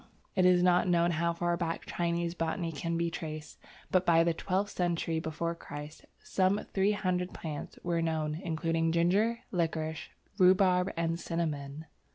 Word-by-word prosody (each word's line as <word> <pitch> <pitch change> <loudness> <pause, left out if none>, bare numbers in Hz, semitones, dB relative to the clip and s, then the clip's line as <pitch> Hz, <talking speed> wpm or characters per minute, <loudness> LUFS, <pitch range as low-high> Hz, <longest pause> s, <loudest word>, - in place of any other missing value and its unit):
It 185 -1 +5
is 180 -1 +5
not 180 0 +4
known 175 -1 +3
how 170 +1 +1
far 175 +1 0
back 170 -1 -3
Chinese 170 0 -1
botany 165 0 -2
can 165 +3 -2
be 170 0 0
traced, 155 -2 -6 0.3
but, 185 -1 +4
by 165 -2 +5
the 170 0 +2
twelfth 195 +4 -1
century 170 -2 0
before 160 +1 -2
Christ, 150 -2 -9 0.2
some 190 +2 +1
three 195 +2 +3
hundred 185 -2 -1
plants 155 -3 -6
were 170 -1 0
known, 160 -1 -1
including 165 -1 0
ginger, 200 +8 +2
liquorice, 160 -3 -2 0.3
rhubarb, 185 0 +5
and 165 0 0
cinnamon. 155 -3 -3
170 Hz, 155 wpm, -31 LUFS, 160-180 Hz, 0.3 s, It